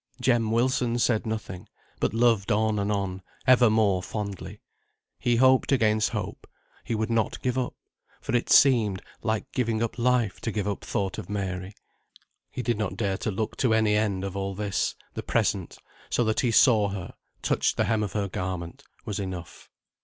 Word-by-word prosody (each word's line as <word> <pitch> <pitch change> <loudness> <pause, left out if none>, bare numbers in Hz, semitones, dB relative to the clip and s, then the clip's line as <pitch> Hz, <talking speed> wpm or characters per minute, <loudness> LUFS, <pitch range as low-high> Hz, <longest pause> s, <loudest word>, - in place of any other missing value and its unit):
Jem 120 -3 +2
Wilson 120 +1 +1
said 120 -1 +1
nothing, 110 -4 -5 0.3
but - - +1
loved 115 -3 +2
on 110 0 +2
and 100 +1 0
on, 95 -2 -2 0.2
ever 125 -2 +6
more 105 -4 +2
fondly; 100 -1 -6 0.6
he 120 - +2
hoped 130 +2 +4
against 110 -5 +3
hope; - - -5 0.4
he 115 - -2
would 110 +1 -1
not 115 -1 0
give 125 -1 0
up, 130 -2 -2 0.4
for 125 - -2
it 120 - 0
seemed 110 -8 +5 0.2
like 110 -2 -2
giving 115 -3 0
up 115 +1 -3
life 120 -5 +1
to 110 - -2
give 105 -2 -2
up 100 - -3
thought 95 -2 -2
of 90 - -8
Mary. 95 -1 -4 0.7
He 125 - -5
did 120 -3 0
not 100 -3 -2
dare 100 -3 0
to 110 - -3
look 105 +2 -3
to 115 -4 +2
any 110 -1 +3
end 100 -3 0
of 100 -1 -4
all 100 0 -3
this; 100 -1 -1 0.2
the - - -4
present, - - -1 0.3
so 120 - +1
that 110 -1 0
he 125 - +2
saw 110 -3 +5
her, 95 -3 -6 0.3
touched - - +1
the - - +3
hem 110 -2 +1
of 105 -3 -3
her 100 -2 -1
garment, 90 -2 -5 0.2
was 105 - -3
enough. 95 -3 -7
110 Hz, 185 wpm, -26 LUFS, 100-115 Hz, 0.7 s, ever